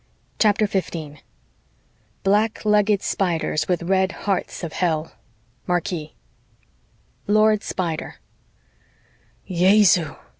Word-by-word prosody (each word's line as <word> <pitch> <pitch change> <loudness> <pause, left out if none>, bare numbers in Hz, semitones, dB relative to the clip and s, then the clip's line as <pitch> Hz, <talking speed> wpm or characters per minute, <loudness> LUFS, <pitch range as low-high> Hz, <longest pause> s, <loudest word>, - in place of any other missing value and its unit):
CHAPTER 215 0 +3
15 165 -7 -4 1.0
black 210 +3 +1
legged 210 -1 +3
spiders 165 -4 -1
with 180 -2 0
red 190 +1 +1
hearts 195 -2 -2
of 165 - -5
hell 160 -3 -1 0.5
marquis 175 -3 -2 1.1
LORD 215 0 +3
SPIDER 170 -4 -4 1.3
"Jesu!" 180 -3 +4
185 Hz, 80 wpm, -22 LUFS, 170-205 Hz, 1.3 s, Jesu